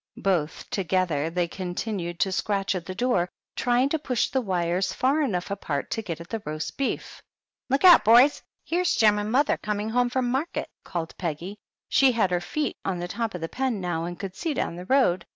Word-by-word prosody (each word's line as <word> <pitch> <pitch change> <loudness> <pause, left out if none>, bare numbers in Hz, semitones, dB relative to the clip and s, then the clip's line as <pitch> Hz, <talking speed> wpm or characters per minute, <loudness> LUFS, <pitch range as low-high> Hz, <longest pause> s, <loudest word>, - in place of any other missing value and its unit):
Both 175 -6 0
together 175 -5 0
they 175 +1 0
continued 180 -1 -4
to 190 - +2
scratch 195 +1 0
at 180 -3 -5
the 185 - -5
door, 195 -5 +1 0.3
trying 245 +1 +2
to 320 - 0
push 255 -5 0
the 265 - 0
wires 185 -2 0
far 275 +8 +2
enough 195 -9 -1
apart 155 -8 -3
to 225 - -1
get 170 -7 -5
at 170 - -9
the 225 +2 -4
roast 155 +1 -4
beef. 275 - -3 0.5
"Look 270 +2 +1
out, 355 -2 +9
boys! 245 +6 +6 0.2
here's 355 +1 +1
Jem 210 -2 +4
and 210 +1 -3
mother 275 +4 +3
coming 210 +1 -2
home 245 +1 +2
from 245 -1 0
market 275 +6 -2
!" - - -58
called 165 -2 -5
Peggy. 175 +4 -4 0.3
She 265 -2 +4
had 205 -5 +1
her 175 -1 +1
feet 300 +11 -2
on 190 -2 -1
the 175 0 -4
top 225 +2 -3
of 180 - -6
the 165 - -2
pen 255 -5 -1
now, 175 -3 -2
and 175 0 -5
could 190 -2 -6
see 325 -4 -2
down 170 - -2
the 180 +1 -8
road. 250 -7 +3
195 Hz, 210 wpm, -26 LUFS, 175-250 Hz, 0.5 s, out